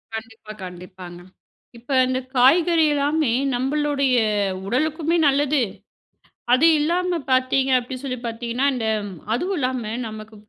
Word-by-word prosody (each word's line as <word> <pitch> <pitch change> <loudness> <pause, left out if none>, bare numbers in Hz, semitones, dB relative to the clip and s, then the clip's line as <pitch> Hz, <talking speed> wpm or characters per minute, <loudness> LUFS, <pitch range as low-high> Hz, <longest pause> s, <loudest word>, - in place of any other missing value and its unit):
கண்டிப்பா, 225 -1 -9
கண்டிப்பாங்க. 180 0 -10 0.6
இப்ப 240 +4 -11 0.2
இந்த 255 0 -1 0.2
காய்கறி 320 +6 +4
எல்லாமே 290 -1 +1 0.2
நம்மளுடைய 280 0 0 0.5
உடலுக்குமே 310 +7 0
நல்லது. 285 0 +2 0.9
அது 260 +6 +5
இல்லாம 350 +3 0
பார்த்தீங்க 260 +1 +2
அப்பிடின்னு 255 +2 -7
சொல்லி 255 -2 -3
பார்த்தீங்கன்னா, 235 +3 -2
இந்த 230 -3 -3 0.5
அதுவும் 365 +10 -2
இல்லாம 255 -5 -2 0.2
நமக்கு 215 0 -10
260 Hz, 110 wpm, -22 LUFS, 230-295 Hz, 0.9 s, அது